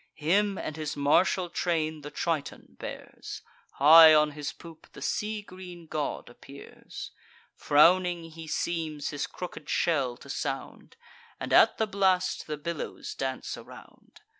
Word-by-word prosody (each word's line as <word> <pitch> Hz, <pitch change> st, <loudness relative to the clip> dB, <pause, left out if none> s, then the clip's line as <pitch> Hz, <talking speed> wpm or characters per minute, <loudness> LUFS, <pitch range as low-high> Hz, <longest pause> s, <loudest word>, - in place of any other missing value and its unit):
Him 195 Hz, +6 st, +1 dB
and 155 Hz, -, -5 dB
his 155 Hz, -2 st, -4 dB
martial 175 Hz, +6 st, +2 dB
train 160 Hz, -3 st, -1 dB
the 145 Hz, -, -7 dB
Triton 155 Hz, -2 st, -4 dB
bears; -, -, -8 dB, 0.3 s
High 155 Hz, +2 st, +9 dB
on 150 Hz, 0 st, +4 dB
his 145 Hz, 0 st, -5 dB
poop 165 Hz, -2 st, -14 dB
the -, -, -11 dB
sea 210 Hz, 0 st, -2 dB
green 180 Hz, -3 st, -11 dB
god 155 Hz, -2 st, -4 dB
appears: 140 Hz, +3 st, -11 dB, 0.4 s
Frowning 170 Hz, +2 st, +3 dB
he 160 Hz, 0 st, -10 dB
seems 155 Hz, -2 st, -2 dB
his 145 Hz, -1 st, -3 dB
crooked 155 Hz, -4 st, -8 dB
shell 135 Hz, -8 st, 0 dB
to -, -, -15 dB
sound, 135 Hz, -1 st, -5 dB, 0.4 s
And -, -, -4 dB
at -, -, +6 dB
the 220 Hz, -, +1 dB
blast 190 Hz, -3 st, 0 dB
the 150 Hz, -1 st, -4 dB
billows 165 Hz, +1 st, -5 dB
dance 130 Hz, -1 st, -4 dB
around. -, -, -15 dB
160 Hz, 140 wpm, -28 LUFS, 150-180 Hz, 0.4 s, High